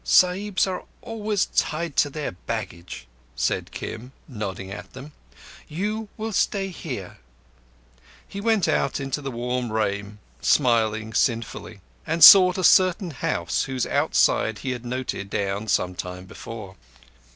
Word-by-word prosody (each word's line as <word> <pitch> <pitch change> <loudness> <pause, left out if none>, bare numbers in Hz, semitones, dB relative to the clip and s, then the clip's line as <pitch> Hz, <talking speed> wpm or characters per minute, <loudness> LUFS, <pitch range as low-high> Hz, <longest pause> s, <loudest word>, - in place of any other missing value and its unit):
"Sahibs 185 +2 +3
are 190 -1 -4 0.2
always 215 -3 -1
tied 160 -1 0
to 145 - +4
their 150 +1 -4
baggage," 85 -6 -6 0.3
said - - -1
Kim, 125 +4 -7
nodding 100 -6 -6
at 100 - -9
them. 135 +3 -10 0.6
"You 210 +7 -3
will 220 0 -4
stay 195 +1 0
here" 125 - -7 1.1
He 200 - -7
went 220 -3 +2
out 140 - 0
into 135 +1 -3
the 140 - -4
warm 125 -1 -3
rain, 105 -1 -2 0.2
smiling 110 -4 +2
sinfully, 115 -4 -1 0.3
and 165 0 +2
sought 185 +1 +10
a 185 - -2
certain 185 0 +4
house 140 - -1
whose 130 -2 -2
outside 110 -1 +2
he 130 - 0
had 125 -1 -5
noted 125 -5 -4
down 100 +2 -2
some 90 -2 +1
time 90 +1 -7
before... 100 -1 -9
130 Hz, 135 wpm, -24 LUFS, -, 1.1 s, sought